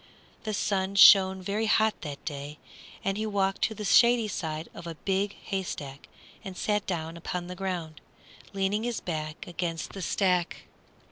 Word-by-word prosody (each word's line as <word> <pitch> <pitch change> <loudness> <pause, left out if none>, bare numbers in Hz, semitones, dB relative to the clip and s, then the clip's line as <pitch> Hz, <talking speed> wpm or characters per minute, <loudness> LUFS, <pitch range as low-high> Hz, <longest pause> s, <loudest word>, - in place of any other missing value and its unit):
The 215 - -2
sun 195 -1 -1
shone 190 -1 +8
very 210 +4 -1
hot 220 0 +2
that 145 -3 -7
day, 145 0 -6 0.5
and 195 0 -1
he 220 - -1
walked 195 -2 0
to 220 - -3
the 210 - -5
shady 235 +3 +5
side 160 -5 -4
of 170 - -9
a 165 - -5
big 195 +4 -1
haystack 145 -8 -5 0.4
and 190 -2 -7
sat 210 -1 0
down 165 -2 -3
upon 175 +1 -4
the 180 - -6
ground, 180 -5 -4 0.5
leaning 195 +2 0
his 240 -1 -2
back 155 -2 -5
against 170 -2 -4
the 195 - -6
stack. 180 -1 0
190 Hz, 160 wpm, -28 LUFS, 165-200 Hz, 0.5 s, shone